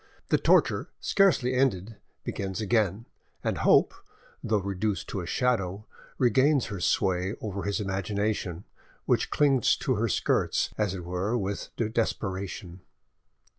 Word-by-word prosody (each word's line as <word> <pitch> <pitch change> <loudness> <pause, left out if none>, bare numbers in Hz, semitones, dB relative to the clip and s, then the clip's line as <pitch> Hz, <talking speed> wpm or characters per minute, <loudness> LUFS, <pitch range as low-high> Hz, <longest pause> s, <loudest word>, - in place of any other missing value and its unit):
The - - +3
torture - - +3
scarcely 170 -11 +3
ended 115 -5 0 0.3
begins 95 0 -4
again, 110 0 +1 0.4
and - - -1
Hope, - - +4 0.5
though 110 - +1
reduced 100 +1 -2
to 95 - -3
a 85 - -7
shadow, 105 -4 0 0.3
regains 130 +3 +3
her 100 - -5
sway 95 +3 +1
over 100 -2 -4
his 100 +2 -1
imagination, 100 -2 -2 0.4
which - - +1
clings 140 -4 +3
to 130 - 0
her 115 +2 +1
skirts, - - +1
as 105 -3 -1
it 90 -2 -7
were, 95 +7 -1
with 100 -2 -3 0.2
desperation. 95 -5 -3
100 Hz, 130 wpm, -27 LUFS, 95-115 Hz, 0.5 s, Hope